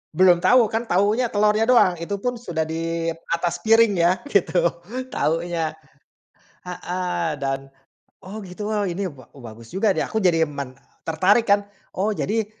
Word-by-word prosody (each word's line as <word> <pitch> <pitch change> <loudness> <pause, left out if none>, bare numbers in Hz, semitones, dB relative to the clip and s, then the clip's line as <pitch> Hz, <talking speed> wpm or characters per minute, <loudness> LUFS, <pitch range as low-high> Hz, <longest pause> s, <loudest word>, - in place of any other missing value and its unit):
Belum 180 -1 +5
tau, 250 +7 +5
kan 225 +1 -2
taunya 210 +7 +2
telornya 210 +1 +2
doang. 185 -9 +4
Itu 185 +4 -3
pun 245 -1 -2
sudah 170 -8 -2
di 165 +1 -2 0.2
atas 170 0 -1
piring 225 -1 +4
ya, 170 +1 +4 0.2
gitu 180 -3 +2 0.5
taunya. 165 -2 -1 0.9
Heeh, 180 -3 -3
dan, 135 -1 -2 0.6
oh, 195 +4 -8
gitu, 200 +2 -6
oh, 210 -2 0
ini 185 +1 -3
ba 135 -3 -15
bagus 115 -1 -12
juga 200 +2 +2
nih. - - 0
Aku 220 - -2
jadi 165 -3 +3
men 140 -3 -7 0.2
tertarik 190 +8 +2
kan. 200 0 +3 0.2
Oh, 210 +3 -1
jadi 215 +1 -1
180 Hz, 150 wpm, -22 LUFS, 165-210 Hz, 0.9 s, Belum